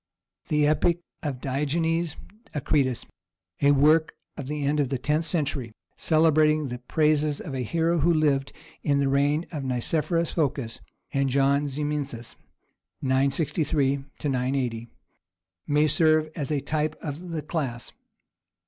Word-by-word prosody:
The 150 Hz, -1 st, +2 dB
epic 160 Hz, +3 st, +2 dB, 0.2 s
of 140 Hz, -5 st, -3 dB
Digenes 160 Hz, +5 st, -1 dB, 0.4 s
Akritas, 135 Hz, -3 st, 0 dB, 0.6 s
a 140 Hz, -, +5 dB
work 155 Hz, +3 st, +4 dB, 0.2 s
of 140 Hz, -, -6 dB
the 150 Hz, 0 st, -3 dB
end 150 Hz, +2 st, +1 dB
of 140 Hz, -3 st, +1 dB
the 135 Hz, -, -1 dB
tenth 150 Hz, +5 st, 0 dB
century, 140 Hz, -8 st, -1 dB, 0.2 s
celebrating 155 Hz, -2 st, +3 dB
the 125 Hz, 0 st, -5 dB
praises 150 Hz, +2 st, +1 dB
of 140 Hz, -, -6 dB
a 130 Hz, -, -2 dB
hero 165 Hz, +7 st, +1 dB
who 165 Hz, +4 st, +3 dB
lived 145 Hz, -4 st, +2 dB, 0.3 s
in 145 Hz, -1 st, +1 dB
the 140 Hz, -1 st, +2 dB
reigns 145 Hz, +4 st, +2 dB
of 150 Hz, -5 st, -4 dB
Nicephorus 155 Hz, +6 st, 0 dB
Phocas 135 Hz, -7 st, -1 dB, 0.3 s
and 140 Hz, -1 st, +1 dB
John 140 Hz, +2 st, +2 dB
Zimisces 140 Hz, -4 st, -4 dB, 0.7 s
[963 140 Hz, +1 st, +1 dB, 0.3 s
80], 125 Hz, -3 st, -1 dB, 0.8 s
may 150 Hz, +1 st, +3 dB
serve 155 Hz, 0 st, +3 dB
as 145 Hz, -4 st, -3 dB
a 150 Hz, -3 st, 0 dB
type 155 Hz, +2 st, -1 dB
of 160 Hz, +4 st, -6 dB
the 160 Hz, -3 st, -3 dB
class. 135 Hz, -7 st, -3 dB
145 Hz, 130 wpm, -26 LUFS, 135-155 Hz, 0.8 s, a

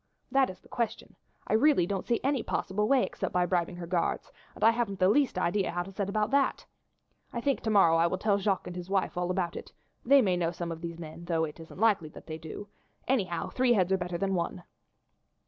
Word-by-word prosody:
That 270 Hz, 0 st, +3 dB
is 185 Hz, -, -9 dB
the -, -, -20 dB
question. 235 Hz, -2 st, -3 dB, 0.3 s
I -, -, -2 dB
really 245 Hz, -, +4 dB
don't 195 Hz, +1 st, -3 dB
see 235 Hz, -, +1 dB
any 275 Hz, -2 st, +1 dB
possible 210 Hz, +1 st, -1 dB
way 270 Hz, 0 st, +4 dB
except 190 Hz, -, -4 dB
by 180 Hz, 0 st, +3 dB
bribing 175 Hz, -1 st, 0 dB
her 175 Hz, -1 st, -6 dB
guards, 170 Hz, 0 st, -1 dB, 0.2 s
and -, -, -6 dB
I 225 Hz, -, +7 dB
haven't 230 Hz, -4 st, -2 dB
the 185 Hz, -, +4 dB
least 275 Hz, -1 st, +2 dB
idea 185 Hz, +2 st, +1 dB
how 175 Hz, +1 st, -2 dB
to 195 Hz, -, -10 dB
set 200 Hz, 0 st, -3 dB
about 210 Hz, +2 st, 0 dB
that. 275 Hz, 0 st, +1 dB, 0.7 s
I 235 Hz, -, -3 dB
think 275 Hz, +3 st, 0 dB
to 225 Hz, -, -2 dB
morrow 180 Hz, -6 st, +5 dB
I 165 Hz, +1 st, +4 dB
will 185 Hz, -, -1 dB
tell 200 Hz, +1 st, +1 dB
Jacques 195 Hz, -1 st, 0 dB
and 180 Hz, -, -7 dB
his 180 Hz, 0 st, -7 dB
wife 195 Hz, -1 st, 0 dB
all 180 Hz, 0 st, -1 dB
about 180 Hz, -2 st, -1 dB
it; -, -, -8 dB, 0.3 s
they 275 Hz, +1 st, +6 dB
may 185 Hz, -4 st, +2 dB
know 170 Hz, -2 st, +1 dB
some 170 Hz, 0 st, -5 dB
of 165 Hz, 0 st, -6 dB
these 170 Hz, -1 st, -5 dB
men, 165 Hz, +1 st, -9 dB
though 165 Hz, -2 st, 0 dB
it 150 Hz, +1 st, -9 dB
isn't 165 Hz, +2 st, -11 dB
likely 205 Hz, -8 st, +2 dB
that -, -, -13 dB
they 160 Hz, 0 st, -6 dB
do; 165 Hz, +6 st, -8 dB, 0.4 s
anyhow, 190 Hz, -10 st, 0 dB
three 255 Hz, -1 st, +3 dB
heads 190 Hz, -4 st, +2 dB
are 190 Hz, -, +4 dB
better 180 Hz, -1 st, -3 dB
than 195 Hz, +1 st, -1 dB
one." 175 Hz, 0 st, -2 dB
190 Hz, 240 wpm, -29 LUFS, 175-220 Hz, 0.7 s, I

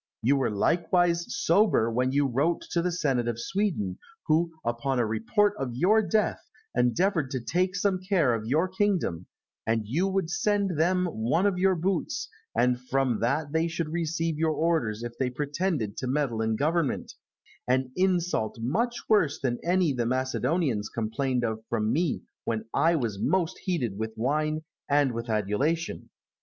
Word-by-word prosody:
You 135 Hz, +5 st, +4 dB
were 135 Hz, -, +1 dB
likewise 170 Hz, -, +2 dB
sober 210 Hz, -, +2 dB
when 125 Hz, +3 st, +1 dB
you 145 Hz, +1 st, +2 dB
wrote 140 Hz, +6 st, +1 dB
to 170 Hz, -, +1 dB
the 180 Hz, +1 st, 0 dB
Senate 135 Hz, -8 st, 0 dB
of 120 Hz, -1 st, -2 dB
Sweden, 135 Hz, -, -1 dB, 0.3 s
who, 165 Hz, +2 st, +2 dB
upon 120 Hz, +3 st, -1 dB
a 120 Hz, -, +2 dB
report 115 Hz, -, +1 dB
of 125 Hz, -3 st, -3 dB
your 200 Hz, -, +4 dB
death, 215 Hz, 0 st, +1 dB, 0.3 s
endeavoured 160 Hz, -, +1 dB
to 130 Hz, -, -2 dB
take 180 Hz, +10 st, 0 dB
some 195 Hz, -1 st, +1 dB
care 180 Hz, -, +2 dB
of 110 Hz, -1 st, -3 dB
your 155 Hz, +9 st, +2 dB
kingdom, 185 Hz, -, 0 dB, 0.4 s
that 115 Hz, -1 st, +1 dB
you 160 Hz, -, 0 dB
would 190 Hz, -3 st, -1 dB
send 200 Hz, +1 st, +1 dB
them 180 Hz, +3 st, +2 dB
one 150 Hz, -, 0 dB
of 195 Hz, -3 st, +1 dB
your 190 Hz, 0 st, +3 dB
boots, 180 Hz, +1 st, -1 dB, 0.3 s
and 125 Hz, +1 st, +3 dB
from 135 Hz, -4 st, +1 dB
that 140 Hz, +6 st, 0 dB
they 160 Hz, +1 st, +2 dB
should 165 Hz, -1 st, -3 dB
receive 165 Hz, -1 st, -1 dB
their 160 Hz, 0 st, +2 dB
orders 155 Hz, -9 st, 0 dB
if 120 Hz, 0 st, -6 dB
they 130 Hz, -2 st, +1 dB
pretended 145 Hz, -, -2 dB
to 130 Hz, -, -3 dB
meddle 130 Hz, -4 st, 0 dB
in 110 Hz, 0 st, 0 dB
government 155 Hz, +3 st, 0 dB, 0.5 s
an 130 Hz, 0 st, +1 dB
insult 180 Hz, -, +1 dB
much 230 Hz, -, -1 dB
worse 185 Hz, -10 st, +3 dB
than 120 Hz, -3 st, -1 dB
any 175 Hz, -3 st, +2 dB
the 120 Hz, -2 st, -1 dB
Macedonians 130 Hz, -2 st, 0 dB
complained 120 Hz, +3 st, -1 dB
of 110 Hz, -1 st, -2 dB
from 110 Hz, -2 st, 0 dB
me 165 Hz, -1 st, 0 dB, 0.2 s
when 110 Hz, -1 st, -2 dB
I 165 Hz, +1 st, +3 dB
was 115 Hz, -9 st, -2 dB
most 185 Hz, -2 st, 0 dB
heated 125 Hz, -, -1 dB
with 110 Hz, 0 st, -4 dB
wine 155 Hz, +6 st, 0 dB, 0.3 s
and 145 Hz, -2 st, +3 dB
with 115 Hz, 0 st, -5 dB
adulation. 110 Hz, -, -1 dB
145 Hz, 165 wpm, -27 LUFS, 120-175 Hz, 0.5 s, You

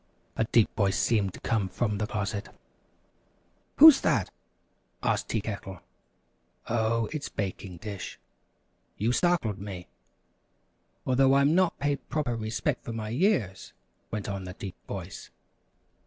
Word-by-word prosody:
a 110 Hz, -, +1 dB
deep 115 Hz, -1 st, +4 dB
voice 100 Hz, -4 st, +1 dB
seemed 105 Hz, -5 st, +2 dB
to -, -, -11 dB
come 105 Hz, -5 st, 0 dB
from 105 Hz, +2 st, -1 dB
the 105 Hz, -, -1 dB
closet. 105 Hz, -1 st, -3 dB, 1.3 s
"Who's 310 Hz, -2 st, +10 dB
that?" -, -, +1 dB, 0.7 s
asked -, -, 0 dB
Tea 110 Hz, -, 0 dB
Kettle. 100 Hz, -4 st, -6 dB, 0.9 s
"Oh, 115 Hz, 0 st, +1 dB
it's 155 Hz, -2 st, -4 dB
Baking 95 Hz, -2 st, -5 dB
Dish! 100 Hz, +1 st, -7 dB, 0.8 s
you 110 Hz, +4 st, +1 dB
startled 125 Hz, -, +1 dB
me!" 95 Hz, -3 st, -7 dB, 1.2 s
"Although 135 Hz, +1 st, +4 dB
I'm 140 Hz, +2 st, +4 dB
not 185 Hz, 0 st, +2 dB
paid 140 Hz, -1 st, -2 dB
proper 140 Hz, -6 st, -1 dB
respect 115 Hz, +5 st, -2 dB
for 115 Hz, -, -5 dB
my 110 Hz, -1 st, -4 dB
years 120 Hz, -, 0 dB, 0.2 s
" -, -, -43 dB
went 105 Hz, -2 st, -3 dB
on 100 Hz, -2 st, -4 dB
the 90 Hz, 0 st, -8 dB
deep 95 Hz, -3 st, -7 dB
voice. 95 Hz, -1 st, -7 dB
110 Hz, 135 wpm, -28 LUFS, 100-130 Hz, 1.3 s, Who's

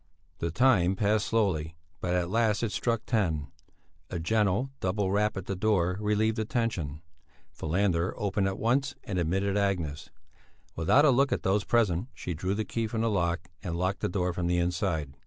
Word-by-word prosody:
The 85 Hz, -, -1 dB
time 95 Hz, -3 st, +3 dB
passed 105 Hz, +1 st, +1 dB
slowly, 85 Hz, -8 st, 0 dB, 0.2 s
but 90 Hz, 0 st, -1 dB
at 90 Hz, 0 st, 0 dB
last 110 Hz, -1 st, +2 dB
it 115 Hz, -, 0 dB
struck 115 Hz, +3 st, -1 dB
ten. 80 Hz, -, 0 dB, 0.6 s
A 90 Hz, -, -3 dB
gentle 105 Hz, +7 st, +1 dB
double 95 Hz, +1 st, 0 dB
rap 105 Hz, +1 st, +1 dB
at 95 Hz, -, -5 dB
the 100 Hz, -, -3 dB
door 90 Hz, -3 st, +1 dB
relieved 105 Hz, +1 st, +1 dB
the 110 Hz, -, 0 dB
tension. 90 Hz, -, -2 dB, 0.5 s
Falander 90 Hz, +1 st, 0 dB
opened 100 Hz, -2 st, 0 dB
at 95 Hz, 0 st, -2 dB
once 135 Hz, +5 st, +1 dB
and 100 Hz, -7 st, -2 dB
admitted 95 Hz, +4 st, 0 dB
Agnes. 85 Hz, -8 st, -1 dB, 0.7 s
Without 105 Hz, -, +4 dB
a 145 Hz, -, +6 dB
look 135 Hz, +2 st, +3 dB
at -, -, -1 dB
those 100 Hz, +2 st, +2 dB
present 105 Hz, -4 st, +1 dB
she 90 Hz, -, -4 dB
drew 90 Hz, +5 st, -2 dB
the 110 Hz, +1 st, -2 dB
key 115 Hz, -1 st, -2 dB
from 110 Hz, +1 st, -2 dB
the 115 Hz, -1 st, +1 dB
lock, 85 Hz, -3 st, -1 dB
and 85 Hz, -3 st, -3 dB
locked 95 Hz, +2 st, -1 dB
the -, -, -1 dB
door 90 Hz, -1 st, -1 dB
from 85 Hz, 0 st, -2 dB
the 90 Hz, 0 st, +2 dB
inside. 85 Hz, -5 st, -1 dB
95 Hz, 185 wpm, -28 LUFS, 85-110 Hz, 0.7 s, a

